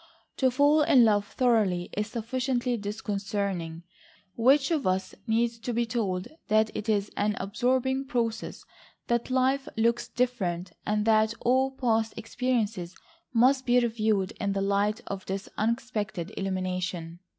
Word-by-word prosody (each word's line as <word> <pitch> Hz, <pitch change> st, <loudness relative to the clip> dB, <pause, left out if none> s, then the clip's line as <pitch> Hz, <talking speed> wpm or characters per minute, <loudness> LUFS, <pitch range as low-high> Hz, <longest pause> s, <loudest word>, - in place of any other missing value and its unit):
To 260 Hz, -, +3 dB
fall 290 Hz, +4 st, +4 dB
in 255 Hz, -5 st, +6 dB
love 205 Hz, -2 st, +2 dB
thoroughly 210 Hz, -9 st, +1 dB
is 210 Hz, 0 st, -1 dB
sufficiently 245 Hz, +2 st, -1 dB
disconcerting. 200 Hz, -5 st, -3 dB, 0.5 s
Which 270 Hz, +6 st, +4 dB
of 300 Hz, -, +1 dB
us 185 Hz, +1 st, 0 dB
needs 230 Hz, +1 st, +1 dB
to 240 Hz, +2 st, -3 dB
be 235 Hz, +1 st, +1 dB
told 200 Hz, -6 st, -2 dB, 0.2 s
that 215 Hz, 0 st, +2 dB
it 210 Hz, -, -4 dB
is 205 Hz, -1 st, +1 dB
an 210 Hz, 0 st, 0 dB
absorbing 255 Hz, +6 st, 0 dB
process, 230 Hz, -3 st, -2 dB, 0.4 s
that 235 Hz, +1 st, 0 dB
life 260 Hz, +1 st, +1 dB
looks 230 Hz, +1 st, +1 dB
different, 190 Hz, -9 st, -1 dB, 0.2 s
and 210 Hz, 0 st, +1 dB
that 220 Hz, 0 st, +3 dB
all 260 Hz, +2 st, +3 dB
past 225 Hz, -4 st, 0 dB
experiences 225 Hz, -6 st, -2 dB, 0.4 s
must 260 Hz, +2 st, +3 dB
be 245 Hz, +1 st, +5 dB
reviewed 220 Hz, -5 st, 0 dB
in 200 Hz, -1 st, 0 dB
the 195 Hz, -, -1 dB
light 200 Hz, +2 st, +1 dB
of 195 Hz, -1 st, -6 dB
this 195 Hz, +1 st, -3 dB
unexpected 215 Hz, -5 st, -2 dB
illumination. 185 Hz, -3 st, -3 dB
220 Hz, 140 wpm, -28 LUFS, 200-245 Hz, 0.5 s, in